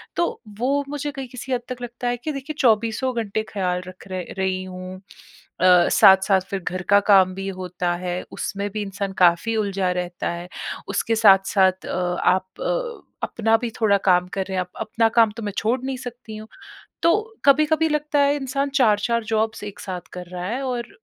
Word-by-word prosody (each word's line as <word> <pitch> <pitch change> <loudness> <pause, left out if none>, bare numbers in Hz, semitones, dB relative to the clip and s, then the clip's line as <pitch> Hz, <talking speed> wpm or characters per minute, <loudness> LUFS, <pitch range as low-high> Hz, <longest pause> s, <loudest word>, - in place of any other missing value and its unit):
तो 345 - -1 0.2
वो 280 +4 +1
मुझे 290 0 -3
कहीं 270 -2 -6
किसी 255 +1 -5
हद 245 - 0
तक 250 -1 -6
लगता 240 0 -5
है 245 - -1
कि 275 +6 -4
देखिए 275 +2 -6
चौबीसों 230 +1 +2
घंटे 215 +1 -2
ख़्याल 180 -3 -1
रख 185 +1 -12
र 185 -1 -3
रही 190 -1 -1
हूँ। 185 0 -8 0.6
अ, 180 -1 +6
साथ-साथ 190 -1 +6
फ़िर 195 - -2
घर 185 +2 -3
का 200 0 +7
काम 190 -3 +6
भी 195 0 -5
होता 180 -1 -2
है, 180 0 -3 0.2
उसमें 200 +1 -3
भी 215 +1 -3
इंसान 200 0 -4
काफ़ी 180 +6 +4
उलझा 195 -3 0
रहता 180 -1 -3
है। 175 +1 -6 0.4
उसके 225 - 0
साथ-साथ 195 -3 +4
अ, - - -3 0.3
आप 185 - +1
अ, - - -2 0.2
अपना 225 0 +1
भी 240 - -3
थोड़ा 205 -2 +4
काम 180 -1 +4
कर 190 -1 -1
रहे 190 -1 -3
हैं। - - +2
अप 180 - -21
अपना 225 +1 +1
काम 225 -2 +5
तो 230 - -5
मैं 205 - -2
छोड़ 230 +5 +1
नहीं 265 0 -3
सकती 245 -3 -8
हूँ। 215 0 -9 0.6
तो 335 - +5 0.3
कभी-कभी 305 +3 +4
लगता 300 -1 0
है 280 0 +4
इंसान 275 0 -2
4-4 230 0 +2
जॉब्स 220 0 -1
एक 205 0 -8
साथ 180 -3 -6
कर 180 -1 -7
रहा 180 0 -5
है 245 +7 -2
और 245 -2 -3
210 Hz, 195 wpm, -22 LUFS, 185-250 Hz, 0.6 s, का